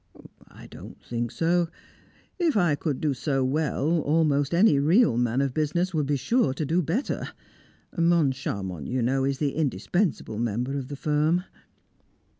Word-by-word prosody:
"I - - -14
don't - - -12
think 120 0 -3
so. 170 +5 +1 0.7
If 330 -9 +2
I 175 -6 +3
could 145 -1 -2
do 150 -3 +1
so 135 +1 -1
well, 155 +3 0
almost 145 -2 +1
any 170 -4 +4
real 170 - +4
man 120 +2 +1
of 135 -2 -1
business 170 +5 0
would 150 -3 0
be 145 - +1
sure 155 - +1
to 155 - -2
do 165 +5 +1
better. 180 - -2 0.7
Moncharmont, 135 - 0
you 125 -1 -1
know, 135 +2 +1
is 135 0 -1
the 145 -1 0
indispensable 145 - -1
member 120 +4 -2
of 135 -2 -4
the 145 - -6
firm." 155 +5 +1
145 Hz, 155 wpm, -26 LUFS, 130-170 Hz, 0.7 s, any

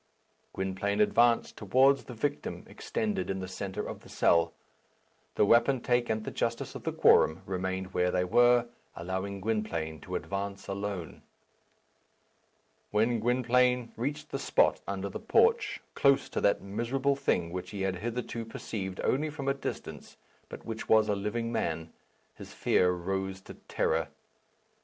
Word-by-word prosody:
Gwynplaine 95 +2 -2
advanced 115 +2 +3
towards 130 +7 +3
the 125 - -9
victim 145 +5 -3
extended 220 - -3
in 95 0 -2
the 95 - -5
centre 95 +1 -5
of - - -6
the - - -16
cell. 85 -1 +3 0.8
The - - +4
wapentake 120 +1 +3
and 110 -1 -1
the - - -5
justice 115 0 -2
of - - -7
the - - 0
quorum 80 +4 +4
remained 95 0 -3
where 90 0 +2
they 90 0 +1
were, 120 +5 +4 0.3
allowing 95 +3 -4
Gwynplaine 85 -8 -2
to - - -6
advance 100 0 -4
alone. 100 -3 -5 1.7
When 115 +3 +2
Gwynplaine 125 +1 +2
reached 140 +6 -3
the - - -2
spot - - +2
under 100 0 -3
the 100 - -6
porch, 460 +1 +2
close 140 -1 +3
to - - -2
that 100 - +2
miserable 120 +7 0
thing 85 -10 0
which 90 0 -5
he 100 -3 -4
had 95 -1 -1
hitherto 120 +2 -4
perceived 100 -4 -5
only 150 +4 +1
from 145 -3 -6
a 135 - +3
distance, 140 - -7 0.3
but - - -9
which 115 -1 -6
was 110 -1 +5
a 105 - +2
living 110 +4 -2
man, 80 -5 -2 0.4
his - - -11
fear 90 - +3
rose 95 +2 -2
to - - -11
terror. 80 -1 -1
105 Hz, 150 wpm, -30 LUFS, 95-120 Hz, 1.7 s, was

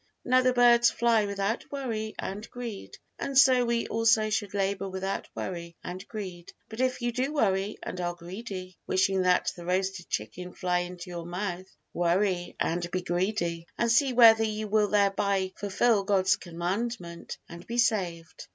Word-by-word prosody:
Now 255 +1 +4
the 255 0 +3
birds 240 -1 +6
fly 230 -3 +2
without 200 +3 -2
worry 225 -6 -3
and 205 +3 -5
greed, 235 -5 -7 0.2
and 275 -1 -2
so 255 -2 +6
we 235 0 0
also 225 -1 +2
should 205 -2 -2
labor 195 0 -1
without 190 +1 -4
worry 170 -2 -5
and 185 +1 -6
greed; 185 -6 -7 0.2
but 220 - -9
if 255 -1 0
you 240 - +1
do 255 +4 -1
worry 205 -7 0
and 180 - -5
are 175 0 -2
greedy, 185 +1 -8
wishing 190 0 +2
that 180 0 +2
the 175 - -9
roasted 185 +1 -1
chicken 180 +12 -4
fly 180 -1 0
into 180 0 -6
your 170 -1 -6
mouth: 180 0 -4 0.3
worry 175 +1 0
and 175 +1 -1
be 185 0 -2
greedy, 175 -2 -1
and 235 -1 +2
see 260 +3 +4
whether 225 -2 +7
you 215 0 -2
will 210 0 +3
thereby 200 -2 +1
fulfil 205 +1 +2
God's 195 -1 +3
Commandment 175 +1 -4
and 170 +1 -11
be 235 - -4
saved! 180 -8 -1
195 Hz, 165 wpm, -28 LUFS, 180-225 Hz, 0.3 s, whether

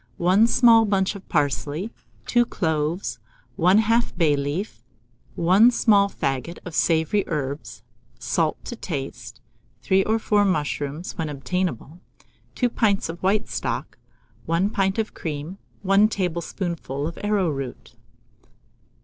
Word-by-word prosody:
1 185 +6 +4
small 230 -1 +6
bunch 195 -2 +1
of 200 -2 -12
parsley, 145 - -1 0.3
2 240 0 +3
cloves, 160 - -2 0.4
1/2 220 +7 +3
bay 155 -4 +3
leaf, 145 - -4 0.5
1 190 +8 +5
small 205 -4 +3
faggot 135 +1 -3
of 180 - -7
savoury 165 +6 +2
herbs, 145 -2 -4 0.3
salt 155 +7 0
to 240 - -5
taste; 135 - -6 0.4
3 190 +7 +3
or 220 +1 +2
4 210 -2 +2
mushrooms, 150 -3 -2
when 160 -2 -1
obtainable; 160 +1 -3 0.6
2 245 - +2
pints 210 -6 +1
of 170 +1 -7
white 200 +3 +1
stock, - - -4 0.5
1 170 +5 +1
pint 195 -1 0
of 220 -1 -2
cream, 155 +4 -6 0.2
1 195 +2 +5
tablespoonful 170 -6 -3
of 165 - -5
arrowroot. 165 - -2
180 Hz, 120 wpm, -23 LUFS, 150-205 Hz, 0.6 s, small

